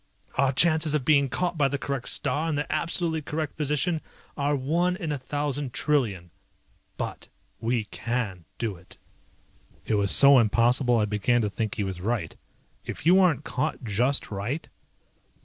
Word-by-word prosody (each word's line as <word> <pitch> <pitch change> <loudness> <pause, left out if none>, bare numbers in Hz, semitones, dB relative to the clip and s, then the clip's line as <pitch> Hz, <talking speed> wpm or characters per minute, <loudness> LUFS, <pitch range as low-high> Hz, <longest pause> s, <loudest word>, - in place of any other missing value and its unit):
Our 135 0 +2
chances 155 +1 +3
of 140 -4 -1
being 140 -3 +4
caught 175 +5 -2
by 140 - +4
the 140 - -2
correct 140 -3 -4
star 160 +3 +2
in 155 - -1
the 145 +1 -1
absolutely 165 0 0
correct 155 +1 -4
position 150 +3 -1 0.3
are 145 0 0
one 170 +7 0
in 170 -5 -4
a 145 - -1
thousand 145 0 -3
trillion, 105 - 0 0.7
but - - -5 0.3
we 115 0 0
can 105 -5 -4
do 110 -4 -3
it!" 85 - -16 0.9
It - - -1
was 100 -2 +1
so 140 +3 +8
impossible 120 +2 +3
I 105 - +2
began 105 +4 +1
to 105 - -1
believe 110 0 -3
he 105 - -2
was 95 -2 -5
right. 105 -4 -2 0.5
"If - - -7
you 180 +3 +6
aren't 165 -7 +3
caught 150 -2 -3
just 120 +6 0
right?" 110 +10 -4
135 Hz, 165 wpm, -26 LUFS, 115-150 Hz, 0.9 s, so